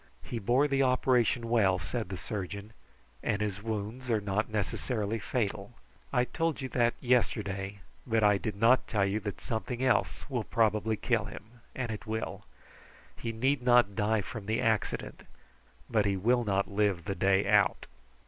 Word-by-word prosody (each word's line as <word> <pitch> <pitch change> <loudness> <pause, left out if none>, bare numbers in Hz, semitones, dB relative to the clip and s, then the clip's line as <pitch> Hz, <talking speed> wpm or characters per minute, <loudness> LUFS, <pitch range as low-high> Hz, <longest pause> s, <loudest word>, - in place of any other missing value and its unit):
"He 115 - -4
bore 125 +7 +3
the 140 -1 +1
operation 125 -2 +2
well," 105 -6 +3
replied 115 +5 -4
the 95 - -4
surgeon, 100 +2 -5 0.5
"and 105 - 0
his 105 -2 -2
wounds 110 +3 -4
are 110 -2 +3
not 105 +1 -1
necessarily 110 +1 -2
fatal. 105 -1 -3 0.4
I 125 -2 +2
told 165 +3 -1
you 130 -2 -4
that 120 -2 +2
yesterday, 100 -6 0 0.3
but 110 -1 +2
I 105 -1 +5
did 105 -1 -3
not 115 +5 +4
tell 105 -4 +1
you 100 +2 0
that 105 -1 -5
something 120 +3 -3
else 125 -4 +1 0.2
probably 110 -1 +2
would - - -29
kill 115 -4 +1
him; 110 +3 -11
and 125 -3 -3
it 110 +1 -7
will. 110 +1 -4 0.7
He 115 - -4
need 130 +4 +1
not 120 -5 +4
die 110 0 +1
from 105 0 -7
the 110 +1 0
accident, 110 -2 -1 0.7
but 105 -3 +2
he 100 -1 +1
will 120 +5 +2
not 100 -2 +1
live 100 -4 0
the 100 - -1
day 95 0 +2
out." 100 -4 +3
110 Hz, 165 wpm, -30 LUFS, 100-120 Hz, 0.7 s, I